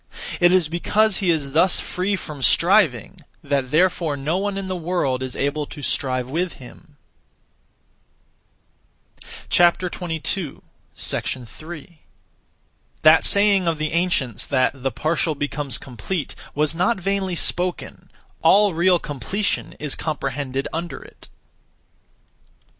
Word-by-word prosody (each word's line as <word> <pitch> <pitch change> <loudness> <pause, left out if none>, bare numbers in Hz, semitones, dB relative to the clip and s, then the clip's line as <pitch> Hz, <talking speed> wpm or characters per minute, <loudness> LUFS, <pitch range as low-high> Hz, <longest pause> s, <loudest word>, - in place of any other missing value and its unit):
It 175 0 +5
is 180 -4 +3
because 205 +6 +1
he 190 -4 0
is 150 -5 0
thus 175 +5 +4
free 190 +3 -1
from 150 -6 -8
striving 170 - +3 0.2
that 135 -3 -1
therefore 165 -1 +2
no 155 +7 -1
one 200 0 -2
in 195 -1 -4
the 185 - -3
world 165 -7 -1
is 130 -1 -5
able 145 +1 -1
to 145 - -10
strive 130 -2 -1
with 170 +6 -2
him. 135 +3 -15 2.5
3. 175 -1 +2 2.8
That 155 +1 +7
saying 200 -3 +5
of 165 -1 +1
the 155 0 -2
ancients 145 - 0
that 130 -2 +2
'the 135 +1 -1
partial 155 +1 -1
becomes 145 -3 0
complete' 135 - -5 0.2
was 150 +2 +1
not 180 +6 +1
vainly 190 -1 -1
spoken: 180 +1 -2 0.3
all 205 -1 +5
real 175 +2 +4
completion 170 - -3
is 150 -2 -3
comprehended 135 -3 -3
under 170 +1 -5
it. - - -16
165 Hz, 115 wpm, -22 LUFS, 140-185 Hz, 2.8 s, That